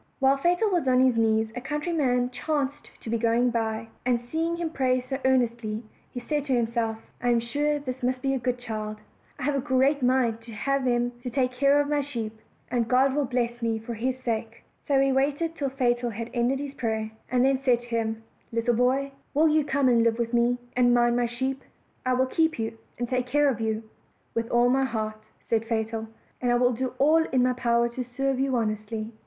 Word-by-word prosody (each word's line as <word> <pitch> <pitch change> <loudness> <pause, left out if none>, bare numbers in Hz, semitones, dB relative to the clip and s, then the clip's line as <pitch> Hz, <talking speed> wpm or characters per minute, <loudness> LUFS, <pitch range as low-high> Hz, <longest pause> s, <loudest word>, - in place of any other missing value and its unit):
While 270 0 +3
Fatal 350 +8 +2
was 345 -7 +1
on 255 -1 +4
his 255 -2 +3
knees 220 -1 +2
a 245 - -4
countryman 275 -4 0
chanced 290 +1 -2
to - - -7
be 230 - +1
going 235 +2 +2
by; 225 -1 -2
and 245 -1 +2
seeing 320 +8 -2
him 335 -2 -2
pray 255 -3 +1
so 255 +2 -4
earnestly, 235 -4 +1 0.4
said 295 +4 -2
to 270 - 0
himself, 230 -1 0 0.2
"I 245 - +1
am 240 -1 +4
sure 290 +6 0
this 260 -3 -6
must 255 +1 -1
be 270 0 +1
a 265 - 0
good 250 0 -1
child; 215 -3 -5 0.4
I 275 - -7
have 290 +2 +1
a 275 - +1
great 275 +1 +2
mind 245 -3 +2
to 230 0 -11
have 275 +4 0
him 240 0 +1
to 250 - -4
take 250 0 0
care 275 +3 +3
of 290 - +1
my 295 0 +1
sheep, 235 -6 -4 0.4
and 235 -2 +1
God 260 +3 +3
will 290 0 +1
bless 240 -1 -2
me 225 -1 0
for 225 +2 -6
his 250 +3 -2
sake." 230 -2 -3 0.2
So 275 -2 +2
he 270 0 +3
waited 285 +5 +1
till 280 -3 -1
Fatal 245 -2 0
had 230 +1 -6
ended 245 +2 +1
his 280 0 -5
prayer, 220 -4 -2 0.2
and 250 +1 +3
then 270 -1 +3
said 250 -3 +3
to - - -13
him: 225 -1 -2 0.3
"Little 230 +1 +1
boy, 260 +4 +1 0.2
will 315 +2 +5
you 305 0 +3
come 280 -1 +1
and 240 -2 +4
live 230 0 +2
with 235 0 -2
me, 240 +1 +3 0.2
and 245 -1 +4
mind 240 0 +3
my 240 -1 +1
sheep? 260 +3 -3 0.5
I 255 - +3
will 260 +1 +3
keep 320 +4 +1
you, 225 0 -3 0.2
and 240 - -2
take 250 0 -1
care 290 +3 +3
of 235 -4 -2
you." 220 0 -1 0.5
"With 230 0 -2
all 240 0 +4
my 265 +2 +3
heart," 215 -3 -3 0.3
said 225 -1 +1
Fatal, 225 0 -2 0.3
"and 245 -1 +1
I - - +4
will 245 +1 +3
do 255 +2 -3
all 315 +3 +4
in 255 -4 +1
my 255 0 +3
power 235 -1 +2
to 250 +2 -4
serve 265 +2 -2
you 270 -1 +1
honestly." 215 -1 -2
250 Hz, 220 wpm, -26 LUFS, 230-270 Hz, 0.5 s, will